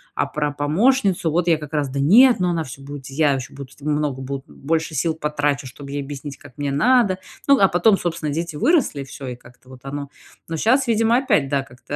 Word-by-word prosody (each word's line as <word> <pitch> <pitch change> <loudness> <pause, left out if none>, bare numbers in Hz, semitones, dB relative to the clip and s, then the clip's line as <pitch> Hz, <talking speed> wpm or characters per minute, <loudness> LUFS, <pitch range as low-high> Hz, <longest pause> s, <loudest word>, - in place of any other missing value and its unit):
А - - +1
про 150 -1 -2
помощницу, 180 - +1
вот, 175 +2 0
я 165 -2 +4
как 150 -2 -9
раз: 145 -2 0
"Да 140 +1 -4
нет, 230 - +6
ну 180 - +2
она 170 -2 -1
всё 130 +1 -10
будет, 140 -1 -9
я 145 +1 +2
ещё 135 -1 -5
буду 140 -2 -9
много, 145 -2 -1
бу 135 +1 -5
больше 160 +2 -2
сил 160 +3 0
потрачу, 145 -3 -1
чтобы 140 +2 -10
ей 145 0 -3
объяснить, 140 0 -7
как 145 0 -16
мне 145 -1 -2
надо". 200 - +3 0.3
Ну 280 0 +6
а 195 - +5
потом, 195 +4 +4
собственно, 165 -5 -3
дети 165 0 -3
выросли, 265 - +2
и - - -4
всё. 135 0 -9
И 125 - -5
как-то 125 +1 -19
вот 130 -1 -12
оно. 140 0 -5 0.4
Но 165 - -3
щас, 255 - +2
видимо, 230 0 +3
опять, 250 - +2
да, 140 -2 0
как-то 130 +2 -9
150 Hz, 225 wpm, -21 LUFS, 140-180 Hz, 0.4 s, нет